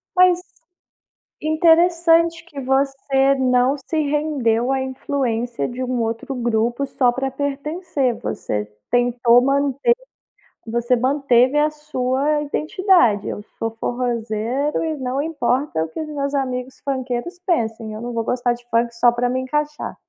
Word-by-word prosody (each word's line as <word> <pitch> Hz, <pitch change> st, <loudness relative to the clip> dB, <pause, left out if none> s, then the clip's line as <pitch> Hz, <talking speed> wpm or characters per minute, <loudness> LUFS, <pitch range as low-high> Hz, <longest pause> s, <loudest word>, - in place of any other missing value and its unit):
Mas 365 Hz, -1 st, +5 dB, 1.0 s
interessante 330 Hz, +1 st, +3 dB
que 290 Hz, -5 st, -8 dB
você 270 Hz, +1 st, +2 dB
não 255 Hz, +1 st, +2 dB
se 300 Hz, +3 st, -4 dB
rendeu 280 Hz, -5 st, 0 dB
a 270 Hz, -, 0 dB
influência 255 Hz, -3 st, -2 dB
de 250 Hz, +1 st, -5 dB
um 250 Hz, -1 st, -1 dB
outro 230 Hz, +4 st, -3 dB
grupo 240 Hz, +2 st, 0 dB
só 250 Hz, -2 st, +2 dB
pra 270 Hz, +1 st, -2 dB
pertencer. 285 Hz, -1 st, -2 dB
Você 105 Hz, 0 st, -3 dB, 0.2 s
tentou 245 Hz, 0 st, +4 dB
manter 280 Hz, -, +2 dB, 0.7 s
você 235 Hz, +2 st, +1 dB
manteve 260 Hz, +1 st, +3 dB
a 300 Hz, +1 st, +3 dB
sua 295 Hz, -1 st, -1 dB
identidade: 305 Hz, -, +2 dB
"Eu 205 Hz, -, -5 dB, 0.2 s
sou 225 Hz, 0 st, -1 dB
forrózeiro 240 Hz, +4 st, -2 dB
e 320 Hz, -1 st, -2 dB
não 260 Hz, +1 st, -2 dB
importa 270 Hz, -, 0 dB
o 160 Hz, -, -5 dB
que 160 Hz, -, -7 dB
os 310 Hz, -, -4 dB
meus 280 Hz, -1 st, -3 dB
amigos 255 Hz, -1 st, -3 dB
funkeiros 260 Hz, +5 st, -3 dB
pensem, 225 Hz, -, -1 dB
eu 215 Hz, -, -7 dB
não 240 Hz, 0 st, -5 dB
vou 230 Hz, -1 st, -1 dB
gostar 245 Hz, 0 st, 0 dB
de 240 Hz, 0 st, -12 dB
funk 235 Hz, 0 st, +1 dB
só 240 Hz, +1 st, +5 dB
pra 245 Hz, +1 st, 0 dB
me 255 Hz, +1 st, -1 dB
encaixar". 295 Hz, +3 st, -3 dB
260 Hz, 140 wpm, -21 LUFS, 240-295 Hz, 1.0 s, Mas